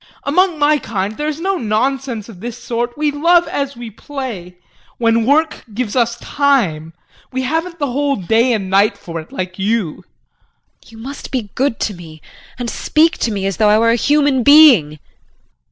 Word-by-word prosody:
Among 355 +4 +2
my 295 0 +3
kind 205 -2 -3
there 300 +4 -3
is 305 0 -3
no 385 +2 -1
nonsense 235 0 -2
of 215 -6 -12
this 235 +3 -6
sort; 240 +1 -4
we 300 0 +1
love 340 +4 +3
as 275 -2 -3
we 235 -2 -8
play 220 -7 -7 0.4
when 230 -1 +1
work 310 +3 +1
gives 235 -2 -3
us 235 -2 +1
time. 195 - 0 0.4
We 260 0 -2
haven't 325 +5 -2
the 285 -5 -2
whole 280 +2 0
day 225 +7 +1
and 200 -4 -2
night 200 +2 +2
for 165 -4 -7
it 155 - -17
like 185 0 -5
you. 205 -4 0
JULIE. - - -16 0.8
You 225 - -15
must 265 +5 -8
be 230 -7 -4
good 265 -2 -1
to 210 - -1
me 165 -3 -12 0.4
and 245 -1 -4
speak 315 +7 +1
to 230 - 0
me 200 -2 -3
as 195 -4 -2
though 215 - +3
I 210 - +5
were 230 +1 +3
a - - +3
human 285 +1 +2
being. 245 - +6
240 Hz, 185 wpm, -17 LUFS, 205-285 Hz, 0.8 s, being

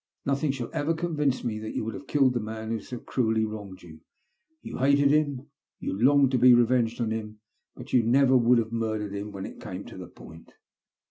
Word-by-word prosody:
Nothing 140 +2 0
shall 125 -4 -6
ever 160 +3 0
convince 150 -5 -1
me 110 -2 -3
that 110 0 -7
you - - -2
would 115 - -4
have 140 - -9
killed 135 -3 +3
the 120 - -1
man 110 0 -6
who 115 - -1
so 125 - -8
cruelly 110 -2 0
wronged 100 -4 -8
you. 80 -2 -13 0.6
You - - -7
hated 140 +1 +4
him; 145 -2 0 0.3
you - - -4
longed 135 +6 +4
to 130 - +1
be 125 0 +7
revenged 120 -1 +2
on 115 -2 -1
him; 110 -1 -5 0.4
but - - -11
you 125 - +5
never 130 +3 +3
would 125 0 +4
have 115 -1 -1
murdered 110 -3 -2
him 100 +1 -5
when 95 -1 -6
it - - -10
came - - -7
to - - -11
the - - -8
i)oint." 80 +1 -14
120 Hz, 215 wpm, -26 LUFS, 110-135 Hz, 0.6 s, be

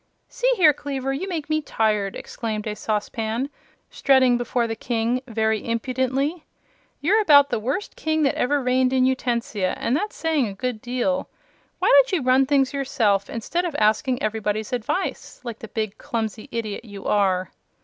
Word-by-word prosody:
"See - - 0
here, 320 -8 +6
Kleaver; 270 -1 -3
you 375 +8 -4
make 325 -5 -3
me 310 0 +1
tired," 215 -7 0
said 215 -3 -4
a 210 -1 -3
saucepan, 220 +5 -2 0.4
strutting 260 -3 +4
before 240 0 0
the 225 -1 -3
King 235 +2 -1
very 220 -2 0
impudently. 260 +7 -1 0.6
"You're 405 +9 +3
about 285 -7 +6
the - - 0
worst 265 - -3
King 315 0 0
that 275 - +3
ever 285 +2 0
reigned 255 +1 +2
in 255 -1 +4
Utensia, 235 -7 0
and 245 - 0
that's 415 +8 -2
saying 315 -6 +1
a 200 - -7
good 250 -1 -3
deal. 255 +3 -1 0.5
Why - - 0
don't - - +6
you 330 -7 +1
run 260 +1 +4
things 275 -2 +2
yourself, 220 -8 +1
instead 290 +10 -2
of 340 -4 -3
asking 220 +4 +1
everybody's 215 0 -2
advice, 250 - -3
like 235 -3 -6
the 225 - -8
big, 215 -2 -4
clumsy 220 -2 -4
idiot 225 -3 -4
you 205 -4 -10
are?" 190 -3 +1
250 Hz, 170 wpm, -23 LUFS, 220-280 Hz, 0.6 s, here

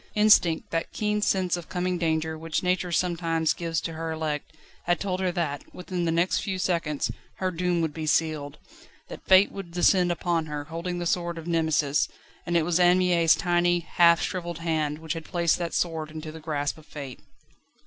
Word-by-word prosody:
Instinct, 210 -6 +4
that 165 - -2
keen 210 0 -1
sense 190 -3 +1
of 175 -2 -8
coming 180 -1 -1
danger 160 -1 0
which 160 +1 -3
Nature 180 0 0
sometimes 165 -2 +1
gives 165 -2 -2
to 165 - -4
her 165 0 -4
elect, 155 -2 -3 0.4
had 175 0 +2
told 185 -2 -2
her 185 -1 0
that, 160 -5 -2
within 180 -1 -3
the 165 - +1
next 170 +3 +2
few 190 -1 -3
seconds, 165 -5 -1 0.2
her 185 -1 -1
doom 175 0 0
would 160 -2 -1
be 155 -1 -5
sealed; 155 -2 0 0.5
that - - -9
Fate 190 +1 +6
would 195 -3 -7
descend 175 +1 +3
upon 170 -2 -1
her, 150 -1 -4
holding 170 +3 -4
the 175 - -3
sword 170 0 -1
of 165 - -7
Nemesis; 160 -4 +1 0.4
and 175 0 +2
it 160 - +2
was 175 +1 +1
Anne 180 0 +5
Mie's 175 -3 +4
tiny, 175 -1 +2
half 170 0 +4
shrivelled 175 -3 -3
hand 160 -3 -1
which 160 0 -4
had 165 -1 -6
placed 170 0 +1
that 170 -1 -2
sword 160 -3 -1
into 155 0 -7
the 160 - -10
grasp 150 -1 -2
of 155 - -18
Fate. 140 -4 -8
170 Hz, 195 wpm, -26 LUFS, 160-180 Hz, 0.5 s, Fate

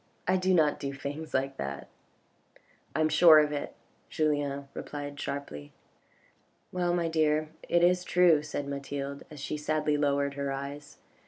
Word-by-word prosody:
I 185 - +3
do 185 0 +1
not 155 -5 +3
do 140 -1 -4
things 145 +3 -6
like 135 +1 -1
that." 70 0 -5 0.5
" - - -33
I 155 - +1
am 155 - +4
sure 160 0 +8
of 150 -1 +4
it," 145 -1 -4 0.3
Julien 145 -3 -1
replied 145 -1 -6
sharply. 75 - -6 1.0
"Well, 175 -1 0
my 170 -1 0
dear, 155 -1 +1 0.2
it 175 0 +3
is 180 +1 +4
true," 175 -4 +4
said 145 -1 -5
Mathilde, 140 0 -5
as 150 -2 -10
she 145 +2 -4
sadly 150 0 0
lowered 140 -1 +1
her 140 0 -3
eyes. 140 +2 -6
145 Hz, 160 wpm, -29 LUFS, 140-155 Hz, 1.0 s, sure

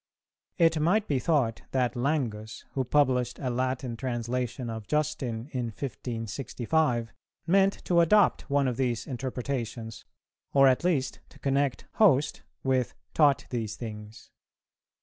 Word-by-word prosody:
It 165 -3 +4
might 195 +8 +2
be 140 -3 +1
thought 130 -6 +1
that 125 -2 +1
Langus, 120 -5 -2
who 135 - -1
published 125 -2 +2
a 130 -2 -2
Latin 130 0 -1
translation 125 0 -3
of 110 -2 -6
Justin 135 -6 -1
in 125 -2 -2
1565, 120 +2 -2 0.3
meant 195 +3 +2
to 175 -1 +3
adopt 200 +1 +3
one 140 -1 +2
of 125 -2 -2
these 125 -4 0
interpretations, 125 -3 -4 0.5
or 135 -1 +7
at 130 +3 +3
least 145 -8 0
to - - -17
connect 135 -2 0
'host' 155 -10 +4 0.2
with 130 -2 +1 0.2
'taught 145 -3 +4
these 110 -3 -2
things.' 105 -1 -9
130 Hz, 130 wpm, -28 LUFS, 120-145 Hz, 0.5 s, or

